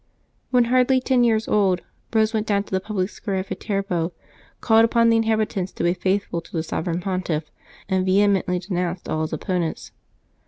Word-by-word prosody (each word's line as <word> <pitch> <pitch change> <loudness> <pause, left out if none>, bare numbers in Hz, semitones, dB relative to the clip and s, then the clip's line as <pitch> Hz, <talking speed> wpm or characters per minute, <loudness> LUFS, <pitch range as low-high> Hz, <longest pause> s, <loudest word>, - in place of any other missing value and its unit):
When 250 -1 +4
hardly 255 +2 +3
ten 255 -1 +2
years 225 -2 +2
old, 190 -4 +2 0.3
Eose 220 0 +2
went 220 -1 -1
down 200 -1 +1
to - - -19
the 190 - +1
public 190 -1 -2
square 200 -3 -4
at 190 0 -3
Viterbo, 190 -5 -2 0.5
called 225 -1 +4
upon 230 0 +4
the - - +4
inhabitants 215 -4 0
to - - -4
be 175 - +3
faithful 185 -1 -1
to - - -18
the 160 -2 -2
Sovereign 165 +2 -3
Pontiff, 175 -5 -2 0.4
and 190 -1 +1
vehemently 190 -1 +2
denounced 180 -1 -3
all 155 - -1
his 160 - -2
oppo 180 +4 -2
nents. 165 -2 -4
195 Hz, 185 wpm, -23 LUFS, 180-220 Hz, 0.5 s, When